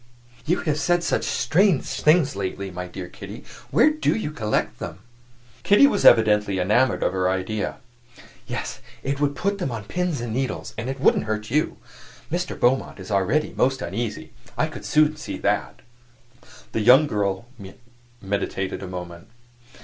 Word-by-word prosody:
"You 175 - +1
have 150 -2 -1
said 175 +1 +2
some - - +1
such - - -4
strange 185 -3 +2
things 155 -2 +2
lately. 95 0 -4
My 90 0 -5
dear 90 0 -7
Kitty, - - -10 0.3
where 305 - +5
do 310 +1 0
you 215 -9 -3
collect 110 -8 -2
them?" - - -6 0.6
Kitty 205 +7 +6
was 210 -8 +1
evidently 105 -3 +5
enamored 110 +8 +2
of - - +1
her 95 -1 +1
idea. 95 +3 -2 0.7
"Yes, - - -4 0.2
it 140 +1 -2
would 145 -1 +1
put 200 +6 -1
them 175 - -1
on 115 -2 -5
pins 175 - -2
and 120 -2 -4
needles, 130 +2 -3
and 115 +4 -4
it 135 0 -4
wouldn't 120 - +3
hurt 110 +1 -3
you. 150 +3 +1 0.5
Mr. 175 +1 -2
Beaumont 125 -3 +1
is 95 +2 -8
already 105 +11 +1
most 135 +1 +2
uneasy; 105 +3 -4 0.3
I - - +2
could - - -8
soon 155 0 +3
see 155 - -6
that." - - -1 0.9
The 110 - -1
young 125 +7 +7
girl 100 -5 -1 0.7
meditated 95 -1 -3
a 95 - -6
moment. 90 0 -8
120 Hz, 165 wpm, -23 LUFS, 100-155 Hz, 0.9 s, young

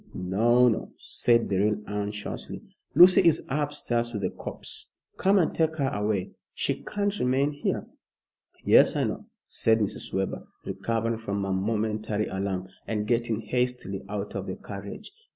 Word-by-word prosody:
"No! 115 +7 +3
no!" 115 - -1
said 115 -1 +2
Beryl, 105 +2 +1
anxiously. 105 0 -4 0.3
"Lucy 185 +2 +9
is 170 -4 +3
upstairs 135 -5 -1
with 105 -2 -3
the 90 - 0
corpse. - - -6 0.2
Come 195 +2 +4
and 175 - +2
take 160 -1 +1
her 140 -4 0
away. 105 -3 -1 0.2
She - - -1
can't 205 0 -2
remain 135 +3 +2
here." 145 - -2 0.8
"Yes, - - +6
I - - +1
know," - - -3 0.2
said 110 -1 +2
Mrs. 105 -3 -2
Webber, 95 0 -2 0.2
recovering 115 +4 -1
from 100 -2 -2
her 95 -1 -1
momentary 105 +1 -1
alarm, 95 -1 -3 0.2
and 105 -1 -1
getting 115 -1 0
hastily 125 -6 -1
out 105 0 -4
of 100 -1 -4
the 95 - -3
carriage. 100 - -8
110 Hz, 150 wpm, -27 LUFS, 100-125 Hz, 0.8 s, Lucy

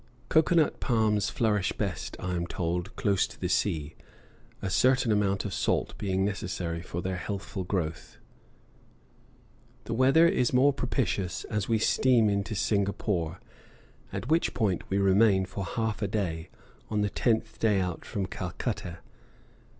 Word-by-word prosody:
Cocoa 160 +2 +4
nut 160 -3 +3
palms 105 -4 +1
flourish 105 -3 +1
best, - - -4
I 90 0 -3
am 85 -1 -2
told, 90 +6 -3
close 100 -3 +1
to - - -14
the - - -1
sea, 75 -1 0 0.7
a - - -4
certain 125 +4 +3
amount 100 -1 +1
of 100 - -3
salt - - 0
being 95 -1 0
necessary 90 -4 -3
for 85 0 -5
their 95 -1 -2
healthful 95 +1 -4
growth. 85 -4 -3 1.7
The 115 - -4
weather 135 +8 +5
is 130 -10 +1
more 135 +3 +5
propitious 105 -9 -1
as 105 -1 -1
we 115 - +3
steam 115 0 +3
into 100 +2 -1
Singapore, 95 -4 -1 0.7
at 125 - -5
which 160 +3 +1
point 95 -6 0
we 95 - +1
remain 100 0 +4
for 95 +1 -5
half 110 +2 -2
a 100 - +1
day, 90 -6 -2 0.4
on 105 -1 0
the 105 - +1
tenth 110 -2 0
day 105 -3 +3
out 90 -3 -3
from 100 -2 -3
Calcutta. 90 0 -4
100 Hz, 150 wpm, -28 LUFS, 90-115 Hz, 1.7 s, weather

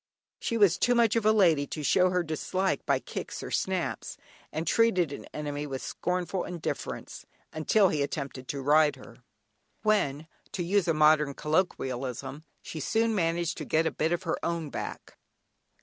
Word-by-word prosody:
She 230 - -1
was 195 -4 +4
too 245 - +3
much 230 -2 +4
of 225 -2 +2
a - - +7
lady 165 -9 +4
to 150 - -5
show 185 +5 +4
her 180 -1 +1
dislike 185 +4 -1
by - - +3
kicks - - -6
or - - -6
snaps, 185 -2 -2 0.3
and 160 +2 -3
treated 185 -5 +2
an - - -8
enemy 145 -1 -4
with 135 -2 -5
scornful 180 0 -2
indifference 175 -3 -5 0.3
until 190 +6 +3
he 150 - -1
attempted 140 -2 -4
to 140 -1 -4
ride 150 +1 +4
her, 120 -3 -14 0.7
when 160 -9 +1 0.3
(to 180 - -2
use 195 +2 +1
a 165 - +2
modern 150 -2 +4
colloquialism) 135 -4 -2 0.2
she 160 - -6
soon 225 +8 +1
managed 170 -2 0
to - - -4
get 160 +1 +1
a - - +1
bit 160 +2 -1
of 175 +2 -1
her 165 - -2
own 165 -3 -2
back. - - -7
165 Hz, 170 wpm, -28 LUFS, 150-185 Hz, 0.7 s, a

